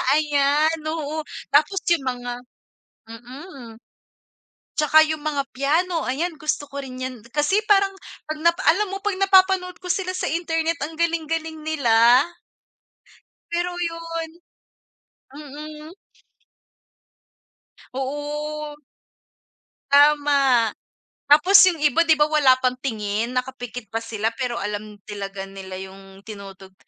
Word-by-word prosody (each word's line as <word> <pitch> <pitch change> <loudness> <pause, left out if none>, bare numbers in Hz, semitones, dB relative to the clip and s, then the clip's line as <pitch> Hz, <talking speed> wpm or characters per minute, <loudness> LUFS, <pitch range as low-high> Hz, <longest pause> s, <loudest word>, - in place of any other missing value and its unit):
Ayan, 300 +1 +2
oo 315 -1 -3 0.3
tapos 310 +7 +3
yung 320 -5 +2
mga 245 -1 -3 0.8
mm. 245 +1 -11 1.0
At 305 -1 -1
saka 315 - +7
yung 310 -1 -3
mga 290 -2 -1
piano 325 +5 +1
ayan 315 +6 -2
gusto 305 0 -2
ko 280 0 -6
rin 255 -1 -9
yan. 255 -3 -5
Kasi 300 +8 +1
parang 395 -1 +4 0.3
pag 310 0 -4
na 340 +1 +5
pa 345 - -8
alam 385 +5 +3
mo 390 - -4
pag 415 - 0
napapanood 375 -2 +4
ko 365 - -10
sila 370 +1 -1
sa - - -2
internet 325 0 -1
ang 320 +2 -6
galing-galing 325 -1 -2
nila. 245 -4 +4 1.3
Pero 350 +1 -1
yun 330 -1 -4 1.1
mm. 300 +2 -10 2.0
Oo. 295 +2 -4 1.2
Tama, 280 -5 +4 0.6
tapos 355 +7 +5
yung 340 -3 -2
iba 295 +3 +4
di 320 -2 +4
ba 300 - +5
wala 295 -4 +4
pang-tingin 235 -4 -2
nakapikit 245 -2 -4
pa 225 0 -2
sila 225 0 -2
pero 245 -1 -3
alam 210 +1 -5
talaga 200 -2 -6
nila 190 -1 -9
yung 195 +1 -12
tinutugtog. 195 -3 -11
295 Hz, 120 wpm, -22 LUFS, 245-325 Hz, 2.0 s, saka